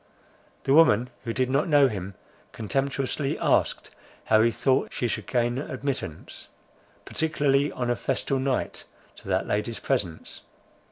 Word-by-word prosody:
The 135 Hz, -, +2 dB
woman, 125 Hz, -6 st, +5 dB
who 115 Hz, -, -1 dB
did 130 Hz, +2 st, 0 dB
not 140 Hz, +5 st, +2 dB
know 145 Hz, -3 st, +5 dB
him, 100 Hz, -4 st, -5 dB, 0.4 s
contemptuously 135 Hz, +4 st, -1 dB
asked, -, -, +1 dB, 0.3 s
how 110 Hz, 0 st, +4 dB
he 115 Hz, -, +4 dB
thought 130 Hz, +4 st, +1 dB
she 120 Hz, -, -1 dB
should -, -, -3 dB
gain 120 Hz, +1 st, 0 dB
admittance, 135 Hz, -, -5 dB, 0.6 s
particularly 145 Hz, -3 st, +1 dB
on 120 Hz, -1 st, -2 dB
a -, -, +1 dB
festal 135 Hz, +3 st, -1 dB
night, 130 Hz, -1 st, -2 dB, 0.3 s
to -, -, -13 dB
that -, -, 0 dB
lady's 110 Hz, +2 st, -1 dB
presence? 95 Hz, -12 st, -3 dB
130 Hz, 135 wpm, -26 LUFS, 115-140 Hz, 0.6 s, woman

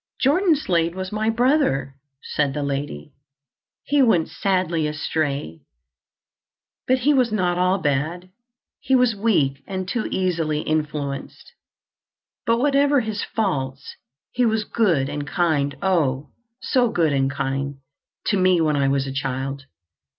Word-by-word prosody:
"Jordan 330 Hz, +5 st, +3 dB
Slade 170 Hz, -, 0 dB
was 185 Hz, 0 st, -5 dB
my 215 Hz, +1 st, 0 dB
brother," 235 Hz, -, +1 dB, 0.3 s
said 145 Hz, -2 st, -1 dB
the 145 Hz, -, -2 dB
lady. 140 Hz, -, -4 dB, 0.7 s
"He 290 Hz, 0 st, +2 dB
went 200 Hz, -11 st, +3 dB
sadly 180 Hz, -5 st, 0 dB
astray, 145 Hz, -, -3 dB, 1.3 s
but 255 Hz, -, +4 dB
he 275 Hz, +4 st, +2 dB
was 255 Hz, -4 st, +2 dB
not 180 Hz, -4 st, 0 dB
all 185 Hz, +1 st, +3 dB
bad. 165 Hz, +3 st, -2 dB, 0.5 s
He 265 Hz, -, +1 dB
was 250 Hz, -3 st, +3 dB
weak 170 Hz, -11 st, +1 dB
and 185 Hz, -2 st, -4 dB
too 240 Hz, +3 st, -2 dB
easily 165 Hz, -5 st, 0 dB
influenced. 150 Hz, -3 st, -3 dB, 1.0 s
But 230 Hz, 0 st, +3 dB
whatever 280 Hz, +1 st, +3 dB
his 215 Hz, -2 st, -3 dB
faults, 140 Hz, -10 st, -3 dB, 0.4 s
he 250 Hz, -, 0 dB
was 220 Hz, -2 st, +2 dB
good 180 Hz, -, +1 dB
and 145 Hz, 0 st, -5 dB
kind—oh! 150 Hz, -3 st, 0 dB, 0.3 s
so 250 Hz, -2 st, +2 dB
good 165 Hz, -7 st, +1 dB
and 135 Hz, -1 st, +1 dB
kind—to 140 Hz, +6 st, -4 dB
me 185 Hz, -1 st, +3 dB
when 155 Hz, -2 st, +2 dB
I 140 Hz, -1 st, +2 dB
was 135 Hz, 0 st, +1 dB
a 135 Hz, -, -5 dB
child. 135 Hz, 0 st, -3 dB
170 Hz, 130 wpm, -22 LUFS, 140-220 Hz, 1.3 s, but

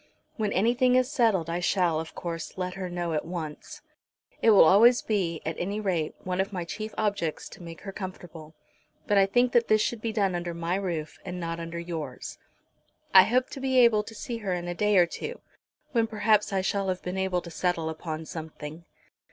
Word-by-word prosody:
When 215 Hz, -3 st, -1 dB
anything 245 Hz, +6 st, +3 dB
is 255 Hz, 0 st, +2 dB
settled 210 Hz, -9 st, +2 dB
I 170 Hz, +1 st, -2 dB
shall, 180 Hz, -3 st, +1 dB
of 160 Hz, 0 st, -7 dB
course, 165 Hz, 0 st, -5 dB
let 180 Hz, -1 st, -3 dB
her 185 Hz, -1 st, -5 dB
know 175 Hz, -1 st, -3 dB
at 155 Hz, -, 0 dB
once. 160 Hz, -3 st, -7 dB, 0.6 s
It -, -, +5 dB
will 210 Hz, -, +8 dB
always 225 Hz, +8 st, +6 dB
be, 180 Hz, -7 st, -1 dB
at 160 Hz, -, -2 dB
any 200 Hz, +4 st, -2 dB
rate, 175 Hz, -7 st, -1 dB
one 185 Hz, 0 st, 0 dB
of 195 Hz, -, -3 dB
my 180 Hz, -3 st, -4 dB
chief 215 Hz, +5 st, -5 dB
objects 200 Hz, -7 st, -1 dB
to -, -, -13 dB
make 165 Hz, -1 st, -9 dB
her 195 Hz, -, -6 dB
comfortable, 175 Hz, -5 st, -8 dB, 0.5 s
but 205 Hz, -1 st, +3 dB
I 195 Hz, -, +5 dB
think 245 Hz, +5 st, +2 dB
that 235 Hz, -1 st, +3 dB
this 215 Hz, -, +4 dB
should 220 Hz, +1 st, -1 dB
be 230 Hz, -, -2 dB
done 200 Hz, -4 st, +1 dB
under 175 Hz, -1 st, -3 dB
my 170 Hz, +1 st, -2 dB
roof 175 Hz, -5 st, -3 dB
and 180 Hz, 0 st, -5 dB
not 165 Hz, -1 st, -4 dB
under 165 Hz, 0 st, -6 dB
yours. 165 Hz, -6 st, -6 dB, 0.7 s
I 190 Hz, -1 st, +10 dB
hope 250 Hz, +2 st, +1 dB
to -, -, -6 dB
be 265 Hz, -1 st, 0 dB
able 235 Hz, -4 st, +6 dB
to 225 Hz, +2 st, -11 dB
see 235 Hz, +2 st, -5 dB
her 195 Hz, -4 st, -2 dB
in 175 Hz, 0 st, -5 dB
a 175 Hz, -, -2 dB
day 210 Hz, +2 st, +2 dB
or 175 Hz, -, +7 dB
two, 170 Hz, -, -6 dB, 0.5 s
when 230 Hz, -2 st, +2 dB
perhaps 215 Hz, -1 st, +2 dB
I 195 Hz, -1 st, +1 dB
shall 195 Hz, +1 st, -1 dB
have 185 Hz, -1 st, -3 dB
been 180 Hz, +1 st, -3 dB
able 190 Hz, -2 st, 0 dB
to 170 Hz, -, -9 dB
settle 170 Hz, -1 st, -1 dB
upon 160 Hz, 0 st, -5 dB
something. 160 Hz, 0 st, -8 dB
185 Hz, 210 wpm, -27 LUFS, 170-210 Hz, 0.7 s, I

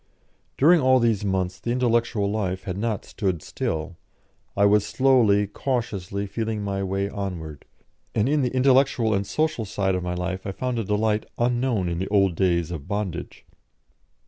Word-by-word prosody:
During 165 Hz, +4 st, +5 dB
all 130 Hz, 0 st, +5 dB
these 115 Hz, -5 st, +1 dB
months 95 Hz, -2 st, -1 dB
the 120 Hz, -, -5 dB
intellectual 120 Hz, -4 st, +1 dB
life 95 Hz, -3 st, -2 dB
had 90 Hz, -2 st, -4 dB
not 105 Hz, 0 st, -2 dB
stood 95 Hz, -6 st, -2 dB
still; 80 Hz, +2 st, -4 dB, 0.6 s
I 100 Hz, -, +5 dB
was 105 Hz, 0 st, +4 dB
slowly, 115 Hz, -4 st, +3 dB
cautiously 100 Hz, -4 st, -3 dB
feeling 110 Hz, +1 st, -3 dB
my 100 Hz, -1 st, -2 dB
way 95 Hz, +1 st, -1 dB
onward. 90 Hz, -8 st, -6 dB, 0.5 s
And 110 Hz, +1 st, +2 dB
in 150 Hz, +1 st, +2 dB
the 125 Hz, -, +1 dB
intellectual 130 Hz, -3 st, +3 dB
and 100 Hz, 0 st, -1 dB
social 155 Hz, -6 st, 0 dB
side 95 Hz, -1 st, -1 dB
of 90 Hz, -, -1 dB
my 90 Hz, 0 st, -3 dB
life 95 Hz, +2 st, -4 dB
I 95 Hz, -, -3 dB
found 125 Hz, +2 st, -2 dB
a -, -, -1 dB
delight 105 Hz, +1 st, 0 dB
unknown 120 Hz, -5 st, +1 dB
in 85 Hz, -1 st, -2 dB
the 95 Hz, -, -2 dB
old 100 Hz, -3 st, +3 dB
days 85 Hz, -1 st, +1 dB
of 80 Hz, -3 st, -6 dB
bondage. 100 Hz, -4 st, -4 dB
100 Hz, 170 wpm, -24 LUFS, 95-120 Hz, 0.6 s, During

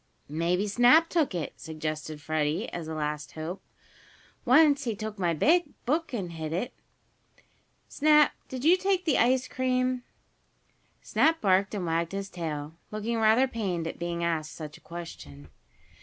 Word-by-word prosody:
"Maybe 170 Hz, +6 st, 0 dB
Snap 245 Hz, +10 st, +5 dB
took 310 Hz, -, +1 dB
it," 165 Hz, -4 st, -3 dB
suggested 155 Hz, -1 st, -5 dB
Freddie, 155 Hz, 0 st, -1 dB
as 170 Hz, -2 st, -6 dB
a 160 Hz, -, -4 dB
last 150 Hz, -1 st, -3 dB
hope. 165 Hz, +5 st, -5 dB, 0.8 s
"Once 285 Hz, +2 st, +5 dB
he 230 Hz, -3 st, -1 dB
took 215 Hz, 0 st, -6 dB
my 175 Hz, -2 st, +1 dB, 0.5 s
book 315 Hz, +6 st, 0 dB
and 195 Hz, -8 st, -4 dB
hid 160 Hz, -2 st, -5 dB
it. 235 Hz, +9 st, -2 dB, 1.1 s
Snap, 300 Hz, 0 st, +4 dB, 0.2 s
did 260 Hz, +1 st, -6 dB
you 350 Hz, +3 st, +6 dB
take 375 Hz, -1 st, 0 dB
the 310 Hz, -, +2 dB
ice 255 Hz, +2 st, +3 dB
cream?" 255 Hz, -1 st, 0 dB, 1.0 s
Snap 325 Hz, +1 st, +2 dB
barked 195 Hz, +1 st, +2 dB
and 190 Hz, -3 st, -3 dB
wagged 165 Hz, +1 st, -1 dB
his 195 Hz, 0 st, -4 dB
tail, 155 Hz, -3 st, -4 dB, 0.2 s
looking 215 Hz, +2 st, -2 dB
rather 225 Hz, +4 st, +4 dB
pained 195 Hz, -9 st, -3 dB
at 165 Hz, -, -5 dB
being 170 Hz, 0 st, -3 dB
asked 160 Hz, -2 st, -1 dB
such 155 Hz, -2 st, -8 dB
a -, -, -16 dB
question. 75 Hz, -, -9 dB
195 Hz, 150 wpm, -28 LUFS, 160-255 Hz, 1.1 s, you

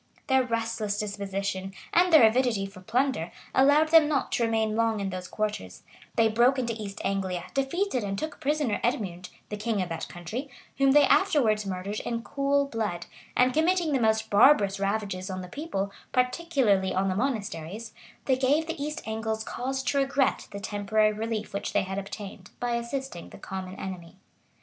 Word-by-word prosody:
{870.} -, -, +2 dB
Their 250 Hz, -3 st, +3 dB
restless 225 Hz, -2 st, -2 dB
disposition, 195 Hz, -2 st, -3 dB, 0.2 s
and 355 Hz, +1 st, +4 dB
their 305 Hz, -9 st, +9 dB
avidity 225 Hz, -3 st, +1 dB
for 195 Hz, -1 st, -11 dB
plunder, 235 Hz, -4 st, 0 dB, 0.2 s
allowed 290 Hz, +4 st, +5 dB
them 320 Hz, -2 st, +7 dB
not 295 Hz, -3 st, 0 dB
to 235 Hz, -, +1 dB
remain 220 Hz, -1 st, +1 dB
long 225 Hz, -1 st, +1 dB
in 195 Hz, -1 st, -2 dB
those 185 Hz, 0 st, -5 dB
quarters; 205 Hz, -, -4 dB, 0.3 s
they 225 Hz, -, +4 dB
broke 240 Hz, +5 st, +3 dB
into 235 Hz, -3 st, -1 dB
East 210 Hz, -3 st, -7 dB
Anglia, 190 Hz, -3 st, -1 dB
defeated 275 Hz, -, 0 dB
and 195 Hz, -1 st, -3 dB
took 310 Hz, +8 st, -5 dB
prisoner 290 Hz, -6 st, 0 dB
Edmund, 190 Hz, -8 st, -2 dB, 0.2 s
the 210 Hz, -, -4 dB
king 215 Hz, 0 st, -1 dB
of 180 Hz, -2 st, -1 dB
that 165 Hz, -, -4 dB
country, 215 Hz, -, -6 dB, 0.3 s
whom 275 Hz, -1 st, +5 dB
they 295 Hz, 0 st, +7 dB
afterwards 230 Hz, -8 st, +3 dB
murdered 195 Hz, +2 st, -3 dB
in 230 Hz, -1 st, -3 dB
cool 280 Hz, +1 st, +1 dB
blood; 215 Hz, -9 st, -3 dB, 0.3 s
and, 250 Hz, 0 st, +4 dB
committing 330 Hz, +1 st, +2 dB
the 265 Hz, -, +2 dB
most 220 Hz, 0 st, +1 dB
barbarous 205 Hz, -3 st, +5 dB
ravages 200 Hz, -2 st, -2 dB
on 185 Hz, 0 st, -4 dB
the -, -, -8 dB
people, 200 Hz, -, -3 dB, 0.2 s
particularly 250 Hz, -, +1 dB
on 190 Hz, +1 st, +1 dB
the 185 Hz, -, 0 dB
monasteries, 215 Hz, -, -3 dB, 0.3 s
they 265 Hz, -, +3 dB
gave 275 Hz, +5 st, +2 dB
the 325 Hz, -3 st, -4 dB
East 300 Hz, +2 st, -4 dB
Angles 220 Hz, 0 st, -2 dB
cause 265 Hz, +4 st, -3 dB
to 280 Hz, +2 st, +1 dB
regret 270 Hz, 0 st, +1 dB
the 200 Hz, -, -7 dB
temporary 210 Hz, +1 st, +1 dB
relief 215 Hz, 0 st, -3 dB
which 200 Hz, -, -3 dB
they -, -, +3 dB
had 190 Hz, +1 st, -3 dB
obtained, 195 Hz, -1 st, -8 dB
by 245 Hz, 0 st, -1 dB
assisting 235 Hz, -4 st, -4 dB
the -, -, -12 dB
common 190 Hz, -1 st, -6 dB
enemy. 180 Hz, -4 st, -7 dB
220 Hz, 180 wpm, -27 LUFS, 195-265 Hz, 0.3 s, their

